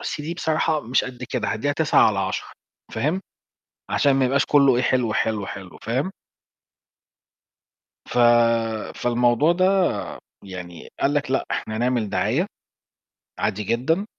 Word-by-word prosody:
أصل 150 - -4
دي 165 +3 -4
بصراحة 160 -2 0
مش 125 0 0
قد 125 -2 -7
كده، - - -1
هادّيها 130 +7 -1
9 155 +1 +4
على 100 -3 -1
10." 95 0 -2 0.5
فاهم، 150 +11 0 0.7
عشان 140 - +3
ما 135 -1 +2
يبقاش 135 +2 +2
كله 140 -4 +5
إيه؟ 125 - +1
حلو، 125 -3 +1
حلو، 105 -3 0
حلو، 95 -2 -9
فاهم؟ 130 +10 -1 2.0
ف - - -4 0.8
فالموضوع 120 +5 +2
ده 185 +1 +2 0.8
يعني 90 -3 -9
قال 140 - +1
لك: 145 -3 -1
"لأ، 135 - 0
إحنا 110 - -3
هنعمل 120 -2 0
دعاية، 110 - 0 0.9
عادي 105 0 -1
جدًا، 130 - 0
125 Hz, 135 wpm, -23 LUFS, 110-145 Hz, 2.0 s, كله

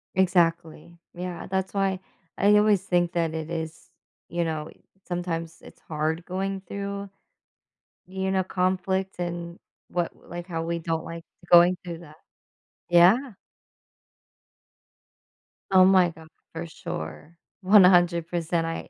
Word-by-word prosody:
Exactly. 170 -2 +1 0.2
Yeah, 180 -1 -6
that's 190 +1 -2
why 195 -2 0 0.4
I 205 +1 +5
always 210 -2 +4
think 175 -2 +1
that 165 -2 0
it 160 0 -5
is, 160 -1 -6 0.4
you 170 0 -1
know, 155 -1 -3 0.4
sometimes 165 -2 -4
it's - - -15
hard 160 +2 -3
going 190 +1 -3
through, 200 +1 -6 1.0
you 190 +1 -3
know, 190 -1 +1
conflict 190 +1 -1
and 175 0 -5 0.3
what 175 -1 -2
like, 175 0 -9
how 165 -3 -3
we 170 0 -2
don't 165 0 -3
like 165 0 -8 0.3
going 175 +1 +7
through 170 -2 -6
that. 155 -3 -14 0.7
Yeah. 175 +6 +7 2.5
Oh 185 -1 +7
my 185 -2 +5
god, 160 -1 -15 0.3
for 165 +1 -5
sure, 150 - -7 0.2
100%, 175 -3 +4
I 165 - -5
175 Hz, 120 wpm, -25 LUFS, 165-190 Hz, 2.5 s, going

